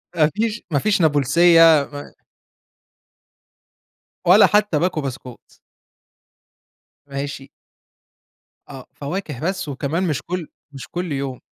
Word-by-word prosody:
ما 155 -2 +3
فيش 225 +1 -2
ما 145 - +2
فيش 200 +2 +1
نابُلسيَّة، 160 +1 +4
ما 145 0 -9 2.1
ولا 190 +5 +7
حتى 210 -7 +1
باكو 170 -2 -1
بسكوت. 130 -2 -9 1.5
ماشي. 140 -1 -6 1.2
آه، 135 -2 -10
فواكة 150 -2 -6
بس، 185 +1 -3
وكمان 145 +6 -2
مش 150 -4 -2
كل 175 -2 -5 0.2
مش 135 -2 -10
كل 175 -1 -5
يوم. 135 -2 -4
155 Hz, 105 wpm, -20 LUFS, 140-180 Hz, 2.1 s, ولا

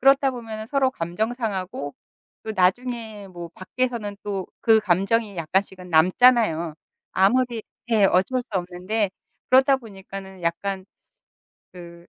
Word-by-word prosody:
그렇다 270 +1 +5
보면은 220 -3 -6
서로 270 0 +2
감정 195 +4 -2
상하고 190 - -4 0.5
또 220 - -4
나중에 215 +1 0
뭐 175 -2 -8
밖에서는 225 0 -3
또 195 -3 -3
그 220 -1 +5
감정이 200 +2 +1
약간씩은 180 +2 -2
남잖아요. 170 -1 +4 0.4
아무리 235 +4 +2 0.3
예 215 -3 +5
어쩔 195 +7 +3
수 - - -41
없는데 185 +4 -2 0.4
그러다 265 +1 +6
보니까는 195 -4 -10
약간 190 +3 -2 0.9
그 170 -1 -11
200 Hz, 275 characters per minute, -24 LUFS, 180-235 Hz, 0.9 s, 그러다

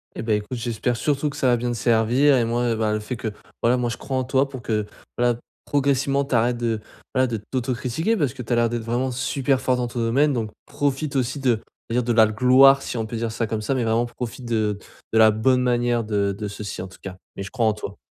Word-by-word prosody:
Eh - - -5
beh, 110 -2 +2
écoute, 105 +4 -5
j'espère 120 +1 -2
surtout 145 +2 0
que 145 - -9
ça 130 - +1
va 125 - +5
bien 120 +1 -2
te 120 - -3
servir 120 +5 +3
et 125 - +3
moi, 120 +1 0
heu 115 - +2
et - - -1
ben, 110 -1 0
le 105 - 0
fait 105 +4 -5
que, 110 -1 -4 0.3
voilà, 120 +2 +4
moi, 120 -1 0
je 115 - -3
crois 135 -1 -4
en 130 - 0
toi 135 +1 +1
pour 130 -2 -8
que, 110 -3 -1 0.3
voilà, 120 -1 +2 0.2
progressivement, 140 0 +1
tu 135 - -1
arrêtes 120 +1 +2
de, 115 -2 -1 0.3
voilà, 130 0 +3
de 115 -2 -2
t'autocritiquer 130 - -1
parce 140 - 0
que 140 - -8
tu 115 - -8
as 120 - +3
l'air 120 0 +3
d'être 120 0 -3
vraiment 120 +3 -1
super 135 +1 0
fort 130 -1 +1
dans 125 -1 -1
ton 120 - -5
domaine 135 +6 +2
donc 110 -4 -2
profite 145 0 -2
aussi 130 +2 0
de 120 -5 +1 0.3
je 115 - -2
veux 125 - +3
dire - - -4
de 120 - -1
la 110 - +9
l 110 0 +1
gloire, 130 +4 +6
si 125 - -5
on 110 - -1
peut 110 - -6
dire 115 0 -2
ça 115 0 -2
comme 110 0 -2
ça 110 - -1
mais 130 -2 0
vraiment 115 +2 +2
profite 120 +1 -7
de 110 -3 0 0.3
de - - +3
la 110 0 +8
bonne 125 +4 +2
manière 120 -1 +1
de 100 -2 0
de 105 -1 -4
ceci, 100 -1 -6
en 95 - -6
tout 95 - -15
cas, 95 -2 -7 0.2
mais 100 - -4
je 100 - -8
crois 120 -3 0
en 110 - +3
toi. 100 -1 -7
120 Hz, 280 wpm, -23 LUFS, 110-130 Hz, 0.3 s, la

